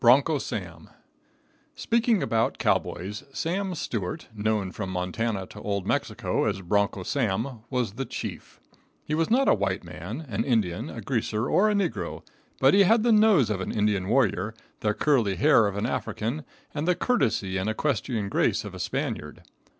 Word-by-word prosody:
Broncho - - +5
Sam. - - -6 0.9
Speaking 230 -2 +2
about 115 0 +1
cowboys, 100 +6 -1
Sam 185 +4 -2
Stewart, 105 - -4
known 105 -3 -1
from 95 0 -5
Montana 95 +3 -2
to - - -11
Old 100 -2 -2
Mexico - - 0
as 100 -3 -1
Broncho 100 +1 +1
Sam, 115 +1 -1
was 125 -6 -1
the 135 +4 -3
chief. - - -7 0.5
He 150 - -3
was 160 +1 +1
not 265 +4 +3
a - - +6
white 100 -2 -1
man, 90 - -7
an 105 -5 -1
Indian, 105 -9 0
a - - -7
greaser 110 +4 -1
or 215 +3 +4
a 210 - +1
negro, 195 -5 -2 0.4
but 135 +1 +5
he 200 - +6
had 220 +3 +5
the 240 - +4
nose 210 - +5
of 95 -2 -1
an - - -3
Indian 105 -3 +1
warrior, 110 -3 +1 0.2
the 105 -1 0
curly 120 -10 +2
hair 135 -5 +5
of 100 0 -3
an 100 - -1
African, 125 +8 -3 0.3
and 150 +2 -2
the 180 - +4
courtesy 110 - +1
and 95 +3 -1
equestrian 115 -3 -1
grace - - +1
of - - -7
a - - -8
Spaniard. - - -3
110 Hz, 170 wpm, -26 LUFS, 100-150 Hz, 0.9 s, a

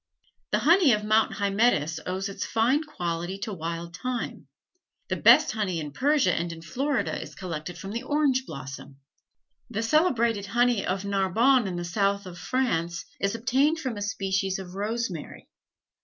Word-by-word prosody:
The - - +2
honey 335 -4 +6
of 210 0 0
Mount 215 +1 +3
Hymettus 200 -7 +1
owes 190 +2 -2
its 195 - -5
fine 245 +7 +2
quality 175 - -4
to 215 -1 -3
wild 170 0 -5
thyme. 250 +4 -4 0.6
The - - 0
best - - +6
honey 205 -6 -1
in 150 -2 -5
Persia 275 - +2
and 170 +1 -2
in 165 0 -9
Florida 240 - -1
is - - -9
collected 175 -2 -6
from 195 - -7
the 230 +2 -3
orange 270 -2 +1
blossom. 135 0 -8 0.7
The 225 -1 -2
celebrated 235 - +2
honey 240 0 +2
of 190 +2 -2
Narbonne 200 +5 +3
in 185 - -3
the 175 0 -3
south 200 +2 0
of 175 -1 -9
France 170 -10 -1
is 200 +2 0
obtained 265 +7 +2
from 260 -7 -3
a 205 - -6
species 195 -2 -1
of 185 -2 -8
rosemary. 205 -4 -4
200 Hz, 160 wpm, -26 LUFS, 175-245 Hz, 0.7 s, honey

